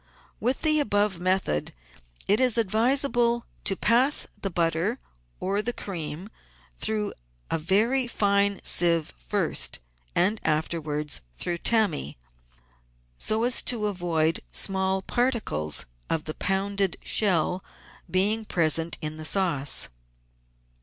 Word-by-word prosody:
With 250 +5 0
the 305 -1 +5
above 205 -7 +1
method 185 - 0 0.5
it 205 +3 +4
is 250 -3 +4
advisable 235 +2 +1 0.2
to 195 - +3
pass 245 +9 +3 0.2
the 195 - -1
butter 170 +7 0 0.4
or 200 +2 -1
the 240 +3 -1
cream 175 0 -6 0.5
through 215 -1 -1 0.4
a 165 - +1
very 220 +10 +2
fine 200 -3 +1
sieve 170 -3 +3
first - - 0 0.4
and 205 +5 +2
afterwards 150 -1 -1 0.2
through 170 - -2
tammy, 200 - +1 1.0
so 220 +1 +1
as 245 +1 +3
to 230 -4 0
avoid 170 -5 0
small 190 0 +1
particles 220 - -1 0.2
of 160 -1 0
the 155 - -4
pounded 195 0 -1
shell 185 -3 +2 0.5
being 205 +4 +1
present 165 -3 +1
in 155 0 -3
the 155 - -7
sauce. 155 -7 +1
195 Hz, 110 wpm, -26 LUFS, 165-220 Hz, 1.0 s, the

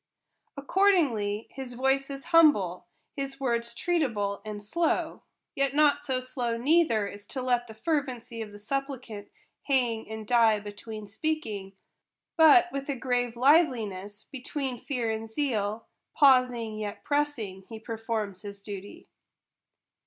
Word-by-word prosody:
Accordingly 280 - +2
his 255 -2 -7
voice 270 +2 +1
is 275 -1 -6
humble, 210 - +4 0.3
his 275 -1 -5
words 235 -3 -1
treatable 235 - 0
and 210 -1 -7
slow; 330 +11 -1 0.3
yet 275 0 0
not 295 -1 +4
so 260 -3 -1
slow 245 -2 -3
neither, 245 -6 +3
as 205 0 -10
to 270 - -5
let 245 -1 +1
the 220 - -11
fervency 250 -4 -2
of 215 -2 -6
the 205 - -11
supplicant 250 -2 -5 0.4
hang 240 -6 0
and 220 0 -6
die 225 -2 +4
between 210 +1 -8
speaking; 215 -5 -3 0.6
but, 325 +2 +7
with 275 +1 -5
a 280 - 0
grave 245 -2 -1
liveliness, 235 - +2
between 265 -1 -4
fear 245 -5 -2
and 220 0 -4
zeal, 220 -4 -1 0.3
pausing 250 -5 +4
yet 205 -1 -5
pressing, 250 -11 -2
he 225 - -7
performs 220 -3 -4
his 200 -1 -8
duty. 200 0 -9
240 Hz, 130 wpm, -28 LUFS, 215-275 Hz, 0.6 s, but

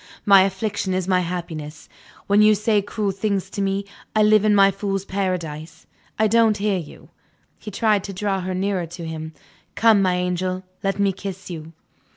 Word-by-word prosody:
My 200 -2 +7
affliction 190 0 -1
is 185 -1 -2
my 185 -1 +3
happiness, 165 -4 -5 0.4
when 205 +1 +4
you 215 0 +6
say 210 0 +1
cruel 205 0 -2
things 195 0 -2
to 200 - -3
me. 195 0 -1 0.3
I 215 - +4
live 215 -1 +5
in 210 -1 +4
my 195 0 +6
fool's 195 0 -3
paradise; 170 -6 -4 0.3
I 220 - +3
don't 220 0 +3
hear 200 -2 0
you." 160 - -12 0.5
He 215 - -8
tried 210 -1 +1
to 195 - -6
draw 195 -1 -1
her 185 0 -3
nearer 190 -2 -1
to 170 +1 -8
him. 160 0 -6 0.4
"Come, 220 -3 +5
my 185 -2 +2
angel; 180 +1 -2 0.2
let 195 0 0
me 200 -1 +2
kiss 190 -1 -7
you." 160 -1 -8
195 Hz, 185 wpm, -22 LUFS, 180-205 Hz, 0.5 s, My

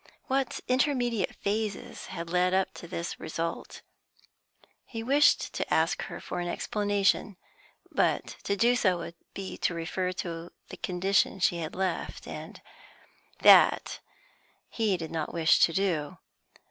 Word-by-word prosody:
What 265 -1 -1
intermediate 250 -5 +1
phases 210 0 -3
had 170 0 -6
led 180 +1 +2
up 190 0 +1
to 170 - -10
this 170 -1 -5
result? 165 +1 -5 1.0
He 225 -2 -6
wished 280 +5 +3
to - - -3
ask - - +2
her - - -7
for - - -5
an 175 - -2
explanation, 205 +1 0 0.5
but - - 0
to 200 - +1
do 240 +4 +4
so 185 -7 +2
would 170 0 -6 0.2
be 195 -1 -6
to 175 - 0
refer 180 +2 -2
to 170 -1 -5 0.2
the - - -8
condition 190 +2 +1
she 175 -1 +2
had 160 -2 -5
left, 185 -2 -3
and - - -8 0.8
that - - +6 0.7
he 215 -5 0
did 165 -2 -6
not 160 0 -3
wish 165 -1 +4
to - - +5
do. 165 -6 -1
185 Hz, 140 wpm, -28 LUFS, 170-210 Hz, 1.0 s, that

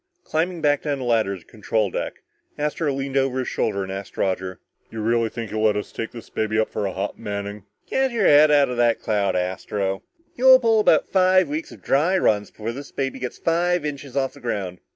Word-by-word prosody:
Climbing 170 +2 -1
back 145 -2 +2
down 145 -2 -1
the 130 - -5
ladder 110 -5 +1
to - - -15
the - - -37
control 110 -2 -1
deck, - - -4 0.3
Astro 150 +1 -1
leaned 135 0 -2
over 135 -1 +1
his 130 - -2
shoulder 100 -3 -1
and 95 - -6
asked 95 0 -7
Roger, 95 -1 -1 0.3
"Do 115 - -10
you 110 - -3
really 115 0 +2
think 115 -2 -6
he'll 110 - -2
let 105 -1 +3
us 105 - -5
take 115 - -4
this 115 -2 -11
baby 110 0 -1
up 110 - +1
for 100 - -2
a - - -3
hop, 95 +2 -4
Manning?" 100 -1 -5 0.2
"Get 265 0 +1
your 230 -5 0
head 150 +1 +7
out 145 -1 +5
of 125 - -4
that 120 -1 +3
cloud, 105 -3 0
Astro. 95 +2 -2 0.3
You'll 260 +1 +8
pull 225 -3 +3
about 215 - +4
three 185 0 +4
weeks 300 +5 -5
of - - -14
dry 165 +8 +2
runs 105 - +2
before 110 +1 -5
this 140 +4 -9
baby 135 -1 -3
gets 125 -1 -5
five 175 0 +1
inches 140 -2 -5
off 135 -1 0
the - - -14
ground." 95 -7 -3
120 Hz, 230 wpm, -23 LUFS, 105-150 Hz, 0.3 s, You'll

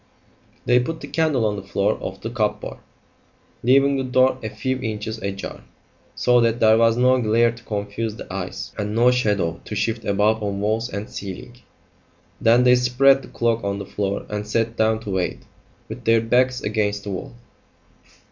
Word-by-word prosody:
They 125 0 +4
put 160 +6 -3
the - - -7
candle 155 -8 +1
on 105 -1 -1
the - - -5
floor 100 +2 0
of 95 0 -6
the 115 - -5
cupboard, 110 -4 -2 0.8
leaving 135 +3 +4
the 135 - -1
door 130 0 +2
a 110 - -4
few 130 +3 -3
inches 110 -2 -4
ajar, 100 -1 -6 0.5
so 125 0 +3
that 115 0 +1
there 110 0 +5
was 115 0 +4
no 130 +1 +4
glare 115 +1 +3
to 115 0 -14
confuse 105 +1 -3
the - - -9
eyes, 95 -1 -5
and 105 +1 -2
no 120 +2 +5
shadow 105 -9 0
to 105 - -6
shift 115 +2 -1
about 105 +2 +1
on 100 -1 -2
walls 110 +3 -1
and 100 -1 -5
ceiling. 100 +5 -8 0.8
Then 120 +2 +5
they 125 0 +6
spread 135 +2 +4
the - - -12
cloak 115 -1 -1
on 100 0 -2
the 100 - -6
floor 100 0 -3
and 105 0 -4
sat 115 +1 -1
down 110 0 +1
to 105 - -6
wait, 95 -2 -2 0.4
with - - -8
their 115 0 +5
backs 125 +3 +1
against 105 -1 -1
the 100 - -5
wall. 95 +4 -6
110 Hz, 185 wpm, -22 LUFS, 105-125 Hz, 0.8 s, they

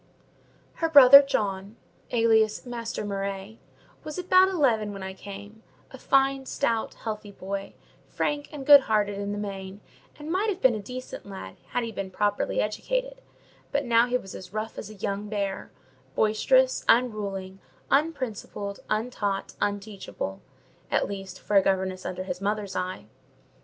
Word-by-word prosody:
Her 330 - +2
brother 280 -2 +10
John, 200 -6 -2 0.3
alias 225 -1 +2
Master 235 -3 -4
Murray, 200 +1 -4 0.4
was 305 -1 -6
about 370 +1 +5
eleven 235 - +1
when 195 -1 -7
I 190 0 -5
came: 205 +3 -10 0.3
a 265 - -11
fine, 270 0 +2
stout, 230 -5 -1
healthy 215 -2 -6
boy, 195 0 -6 0.3
frank 290 0 -2
and 285 -3 -7
good 290 0 +10
natured 210 -2 +3
in 200 0 -4
the 205 - -3
main, 195 -1 -6 0.4
and 300 +2 -6
might 400 +5 +1
have 380 -2 -2
been 260 -8 +5
a 215 - -4
decent 250 +1 -8
lad 190 - -9
had 245 - -1
he 230 - -4
been 195 -2 -5
properly 205 +2 0
educated; - - -2 0.5
but 285 0 0
now 235 0 +4
he 250 0 +1
was 195 -6 -10
as 180 -1 -9
rough 215 +1 -4
as 210 - -7
a 215 - -11
young 200 +1 -3
bear, 200 -2 -3 0.5
boisterous, - - +3
unruly, 200 -5 +1 0.3
unprincipled, 255 -9 -1
untaught, 215 -3 -2
unteachable—at 200 - -4
least, 195 -1 -7
for 205 - +1
a - - +8
governess 190 -1 -1
under 185 0 -4
his 180 0 -5
mother's 205 -1 -2
eye. 185 - -3
215 Hz, 150 wpm, -26 LUFS, 195-255 Hz, 0.5 s, brother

